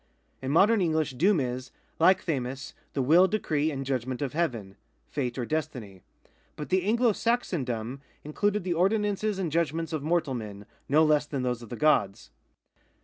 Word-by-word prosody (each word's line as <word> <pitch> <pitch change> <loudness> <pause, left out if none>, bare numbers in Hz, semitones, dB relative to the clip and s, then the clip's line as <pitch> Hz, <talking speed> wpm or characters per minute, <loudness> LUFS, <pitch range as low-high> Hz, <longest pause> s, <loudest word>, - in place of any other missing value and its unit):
In 130 - -4
modern 200 +8 +4
English 160 -4 +1
doom 175 +8 +2
is, 125 -1 -3 0.3
like 185 +3 +4
8tj.iu:, 135 -4 -3 0.2
the 135 - 0
will, 170 +8 +6
decree 160 -7 0
and 135 -3 -4
judgment 130 -1 -2
of 140 - -3
Heaven 120 - -2 0.2
— - - -43
fate 125 -4 -2
or 125 - -2
destiny; 125 -11 -4 0.5
but 150 - -7
the 185 0 +2
Anglo 230 +4 +3
Saxon 230 - 0
dom 120 +2 -4 0.2
included 205 +7 -1
the 180 -1 -1
ordinances 205 +3 +1
and 180 -5 -2
judgments 165 0 -1
of 155 - -2
mortal 160 -2 0
men, 105 -4 -7 0.2
no 150 +3 +5
less 150 -1 +2
than 140 -4 -3
those 125 -1 -1
of 115 - -11
the - - -5
gods. 110 -7 +1
150 Hz, 175 wpm, -27 LUFS, 125-180 Hz, 0.5 s, will